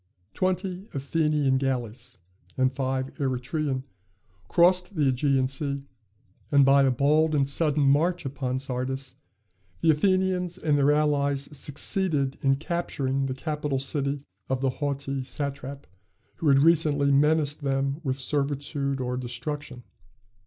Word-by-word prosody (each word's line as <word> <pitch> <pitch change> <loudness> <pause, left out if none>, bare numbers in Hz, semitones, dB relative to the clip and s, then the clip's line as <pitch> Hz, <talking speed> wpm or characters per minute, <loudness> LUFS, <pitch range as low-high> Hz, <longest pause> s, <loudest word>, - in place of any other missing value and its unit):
Twenty 185 +1 -2
Athenian 145 -1 +1
galleys, 125 -2 -3 0.4
and 130 0 +2
five 130 0 -2
Eretrian, 135 +1 -1 0.6
crossed 180 +2 +3
the 155 - +1
Ægean 130 0 +1
Sea, 140 +1 -3 0.7
and 140 -1 +6
by 140 +1 +6
a 135 - +4
bold 150 +5 +2
and 140 -2 +2
sudden 150 +1 +2
march 165 +5 +2
upon 130 -1 -2
Sardis, 130 0 -3 0.7
the 160 - +5
Athenians 185 +1 +1
and 155 -5 +1
their 145 0 +4
allies 145 -1 +1
succeeded 145 0 -1
in 135 0 +3
capturing 135 -4 -2
the 130 - -3
capital 150 -1 -2
city 140 +1 -2 0.3
of 130 -1 0
the 135 -1 +1
haughty 140 -1 -2
satrap 140 0 -5 0.5
who 160 - -2
had 140 -1 +6
recently 145 -2 +3
menaced 150 +1 +2
them 135 +1 -1
with 130 -3 -1
servitude 140 0 -1
or 125 0 -2
destruction. 125 +1 -5
140 Hz, 125 wpm, -26 LUFS, 135-150 Hz, 0.7 s, and